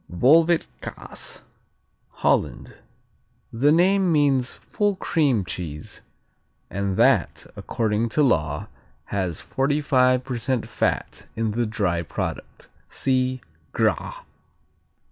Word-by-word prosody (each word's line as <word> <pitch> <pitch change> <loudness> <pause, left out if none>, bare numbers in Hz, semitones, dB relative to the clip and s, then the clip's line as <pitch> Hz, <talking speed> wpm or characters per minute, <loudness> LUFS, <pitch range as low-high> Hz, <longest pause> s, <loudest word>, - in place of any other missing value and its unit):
Volvet 160 - +4 0.2
Kaas - - -6 0.8
Holland - - 0 0.7
The 135 +6 +3
name 185 +3 +4
means 140 -5 +2
"full 205 -2 -1
cream" 140 - +1
cheese 75 -4 -6 0.7
and 100 0 -2
that 120 -4 +2
according 110 0 -1
to 150 - +2
law 75 - +1 0.5
has 95 -5 -2
45% 130 -3 +1
fat 115 - -2
in 110 -1 -1
the 115 +2 -1
dry 100 -6 0
product 85 - -6 0.2
(See 130 -1 0 0.3
Gras.) - - 0
125 Hz, 90 wpm, -24 LUFS, 100-145 Hz, 0.8 s, Volvet